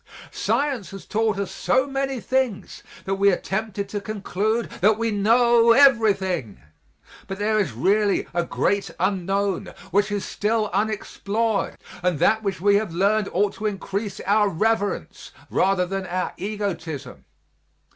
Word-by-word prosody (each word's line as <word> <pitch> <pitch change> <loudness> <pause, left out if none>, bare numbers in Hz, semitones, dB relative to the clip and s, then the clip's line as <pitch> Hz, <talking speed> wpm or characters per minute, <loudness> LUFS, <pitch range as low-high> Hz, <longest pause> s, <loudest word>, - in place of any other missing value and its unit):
Science 275 -9 -1
has 195 -1 -10
taught 215 0 0
us 200 -2 -3
so 260 +1 +1
many 270 -1 -2
things 255 -3 -2 0.2
that 195 - -1
we 200 0 +6
are - - +2
tempted 200 0 -3
to 205 +1 -4
conclude 215 +2 -2
that 210 +3 +4
we 230 0 -1
know 230 +3 +4
everything, 205 - +3 0.7
but 195 - -5
there 215 +1 +1
is 185 - -1
really 200 - +1
a 175 0 +1
great 200 +3 0
unknown 195 +1 -1 0.2
which 205 +3 +2
is 205 -1 -2
still 215 0 -1
unexplored 215 +1 -1 0.2
and 180 -3 +1
that 220 +9 +3
which 195 -4 -2
we 200 +2 +4
have 210 -4 -2
learned 200 +4 +1
ought 200 +2 +1
to 215 - -3
increase 200 0 -4
our 205 +1 +3
reverence 205 +3 -1 0.2
rather 190 -1 +2
than 190 +1 -4
our 180 +1 -2
egotism. 175 -10 -5
205 Hz, 145 wpm, -23 LUFS, 195-220 Hz, 0.7 s, we